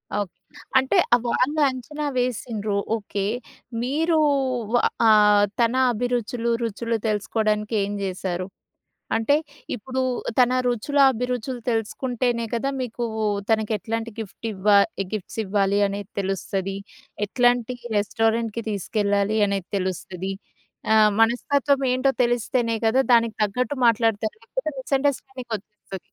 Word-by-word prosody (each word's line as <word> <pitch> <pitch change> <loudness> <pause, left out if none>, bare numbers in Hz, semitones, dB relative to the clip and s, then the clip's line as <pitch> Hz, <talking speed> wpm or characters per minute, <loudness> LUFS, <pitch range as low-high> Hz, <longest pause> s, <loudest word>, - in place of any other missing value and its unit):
Okay. 205 -4 -2 0.4
అంటే 265 0 +3 0.3
వాళ్ళు 290 +6 +1
అంచనా 295 +4 -5
వేసిండ్రు 225 -4 -1 0.2
ఓకే. 205 -2 -3 0.6
మీరు 315 +5 +1 0.9
ఆహ్, 210 -1 +6
తన 235 +1 +3 0.2
అభిరుచులు 240 0 -1
రుచులు 230 +1 -2
తెలుసుకోవడానికి 215 +1 0
ఏం 200 +1 -3
చేశారు? 185 -1 -3 0.7
అంటే 225 +6 +2 0.4
ఇప్పుడు 260 +3 -4 0.4
తన 250 0 +5
రుచుల 245 +4 0
అభిరుచులు 250 0 -3
తెలుసుకుంటేనే 235 +1 -1
కదా! 275 +4 0
మీకు 240 0 -4 0.5
తనకెట్లాంటి 225 +1 -1
గిఫ్ట్ 220 +1 -7
ఇవ్వా 200 +1 +3 0.4
గిఫ్ట్స్ 215 +1 -5
ఇవ్వాలి 200 0 +1
అనేది 200 0 -5
తెలుస్తది. 195 0 -2 0.5
ఎట్లాంటి 245 +1 +2 0.2
రెస్టారెంట్‌కి 225 +2 0
తీసుకెళ్లాలి 205 +1 0
అనేది 195 -2 -2
తెలుస్తది. 185 0 -3 0.6
ఆహ్, 215 -1 +6
మనస్తత్వం 275 +4 +2
ఏంటో 265 +1 +2
తెలిస్తేనే 240 -1 0
గదా! 260 +4 +4
దానికి 230 -2 +2
తగ్గట్టు 250 +7 -2
మాట్లాడతారు 225 -2 +2
లేకపోతే 265 +6 -4
మిసండర్‌స్టాండింగ్ 265 -2 -2
ఒచ్చేస్తది. 200 -1 -11
225 Hz, 105 wpm, -24 LUFS, 205-250 Hz, 0.9 s, ఆహ్